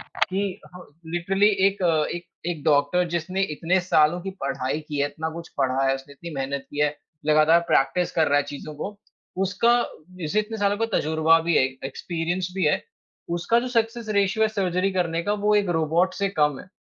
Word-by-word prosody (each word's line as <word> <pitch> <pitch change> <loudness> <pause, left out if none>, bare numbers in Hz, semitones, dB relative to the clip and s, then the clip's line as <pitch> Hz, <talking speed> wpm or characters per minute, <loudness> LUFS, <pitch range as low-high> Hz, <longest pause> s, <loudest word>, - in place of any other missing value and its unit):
कि 195 0 -2 0.5
लिटरली 195 +4 +3 0.2
एक 200 0 -1
अ, 160 -3 +3
एक 175 0 -6 0.3
एक 155 -4 -5
डॉक्टर 150 +4 +3
जिसने 175 +3 -2
इतने 175 +5 +1
सालों 175 -1 +3
की 195 +2 -5
पढ़ाई 135 +1 -2
की 150 - -4
है, 145 - +3
इतना 160 +2 -4
कुछ 170 +1 -8
पढ़ा 135 0 +1
है, 135 - +3
उसने 135 +1 -9
इतनी 170 +4 -9
मेहनत 135 0 -3
की 145 - -4
है, 150 0 +1 0.3
लगातार 155 +2 +5
प्रैक्टिस 175 +6 +2
कर 160 -2 +2
रहा 145 0 +4
है - - +2
चीज़ों 150 +2 -7
को। 200 +8 -6 0.5
उसका 200 +5 +2 0.5
जिसे 165 +4 -1
इतने 220 +1 -5
सालों 205 0 +2
का 225 - +1
तजुर्बा 160 +1 +3
भी 165 +1 +1
है, - - +5 0.2
एक्सपीरियंस 175 +5 -3
भी 190 -2 0
है, 150 - +2 0.6
उसका 230 +7 +2
जो 250 - -4
सक्सेस 230 -1 -1
रेशियो 200 +3 +2
है - - +2
सर्जरी 195 -2 0
करने 170 -2 0
का 205 - 0
वो 210 - +4
एक 205 -3 +2
रोबोट 170 +4 +1
से 200 +1 0
कम 150 -2 +3
है। - - -11
170 Hz, 195 wpm, -24 LUFS, 150-195 Hz, 0.6 s, लगातार